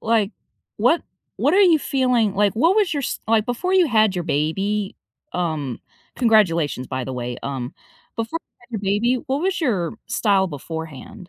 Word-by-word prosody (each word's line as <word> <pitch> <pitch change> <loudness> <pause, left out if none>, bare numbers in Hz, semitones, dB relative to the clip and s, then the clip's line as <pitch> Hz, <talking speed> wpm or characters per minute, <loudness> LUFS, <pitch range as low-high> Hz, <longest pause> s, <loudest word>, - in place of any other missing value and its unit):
Like, 220 -2 +1 0.4
what 250 +10 +3 0.3
what 290 - +2
are 395 - +5
you 350 -5 +6
feeling 250 -7 +1
like, 205 0 +2
what 330 - +3
was 400 -7 +2
your 285 - -1
s - - -3
like, 220 -1 +3
before 360 +11 -1
you 365 -2 +5
had 215 -4 +3
your 175 -2 -2
baby, 195 +7 -1 0.4
um 155 -8 -2 0.4
congratulations, 170 - +2
by 130 0 -3
the 130 - -5
way. 125 -1 -4
Um, 130 -3 -4 0.4
before 230 +8 -2
you - - -61
had 240 +1 -22
your 220 - -2
baby, 205 +6 +1
what 275 +3 -1
was 375 0 0
your 205 - 0
style 200 -4 +2
beforehand? 160 +2 -8
210 Hz, 175 wpm, -22 LUFS, 165-250 Hz, 0.4 s, you